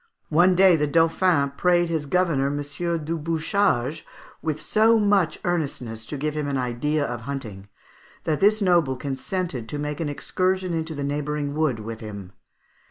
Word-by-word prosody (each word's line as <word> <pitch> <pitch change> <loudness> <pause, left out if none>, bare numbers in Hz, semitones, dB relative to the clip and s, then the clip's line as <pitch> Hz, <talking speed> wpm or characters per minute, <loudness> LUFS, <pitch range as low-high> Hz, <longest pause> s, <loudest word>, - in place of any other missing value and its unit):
One 175 +4 +4
day 185 -1 +6
the 150 -1 +1
Dauphin 165 -1 +2
prayed 175 +3 +2
his 160 -3 -2
governor, 165 -5 +2
M. 145 +1 -2 0.5
du 165 +2 -2
Bouchage, 160 - 0 0.4
with 155 -2 -2
so 220 +6 +3
much 200 -6 +2
earnestness 125 -10 -3
to 145 - -5
give 150 +2 -2
him 150 -1 -2
an 140 -1 -1
idea 130 +4 -1
of 120 -3 -4
hunting, 110 -7 -6 0.5
that 155 -2 0
this 210 +1 +4
noble 170 -8 +3
consented 135 -1 -4
to 150 - -4
make 150 0 -4
an 160 -3 -2
excursion 185 +4 -1
into 160 -1 -3
the 145 - -4
neighbouring 145 0 -2
wood 150 -6 0
with 115 +1 -6
him. 100 -4 -8
150 Hz, 165 wpm, -24 LUFS, 135-175 Hz, 0.5 s, day